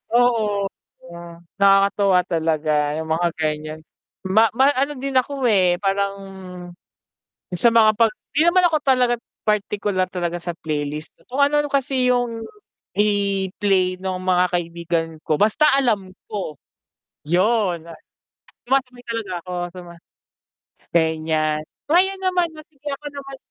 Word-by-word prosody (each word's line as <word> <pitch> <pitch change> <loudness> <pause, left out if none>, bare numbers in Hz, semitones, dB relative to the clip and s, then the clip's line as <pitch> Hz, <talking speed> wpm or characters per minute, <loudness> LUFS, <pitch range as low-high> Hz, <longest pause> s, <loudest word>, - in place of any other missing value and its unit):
oo, 220 -5 +2 1.0
nakakatuwa 195 -1 +4
talaga 155 -3 0
'yung 160 0 -5
mga 170 +2 +2
ganiyan, 155 0 -3 0.5
ma 215 +4 +4
ma 275 +2 +5
ano 280 +3 0
din 270 +1 -4
ako, 270 0 0
eh, 185 -5 +3
parang, 200 0 0 1.4
sa 235 +7 +4
mga 220 -2 +5
'pag 225 0 +3 0.2
hindi 305 - +4
naman 365 0 +3
ako 320 -2 +2
talaga 250 -3 +3 0.3
partikular 205 -2 0
talaga 175 -1 -3
sa 175 -1 -4
playlist, 150 0 -4 0.2
kung 265 - -4
ano-ano 295 0 +2
kasi 260 -2 +1
'yung 240 -2 0 0.5
i-play 195 -2 +1
nung 185 -1 -3
mga 180 -1 +3
kaibigan 170 -1 -1
ko 155 - 0
basta 215 +9 +3
alam 215 -9 +1 0.2
ko, 185 -8 -5 0.7
'yun 180 -1 +1 0.8
sumasabay 250 -2 0
talaga 225 -5 -4
ako 180 - -7 0.2
suma 175 -1 -10 1.0
ganiyan. 155 -2 +1 0.3
Ngayon 380 +3 +3
naman 365 -2 +2
oh - - -15
sige 290 0 -9
ako 295 +2 -7
naman 275 -1 -8
200 Hz, 125 wpm, -21 LUFS, 175-250 Hz, 1.4 s, ma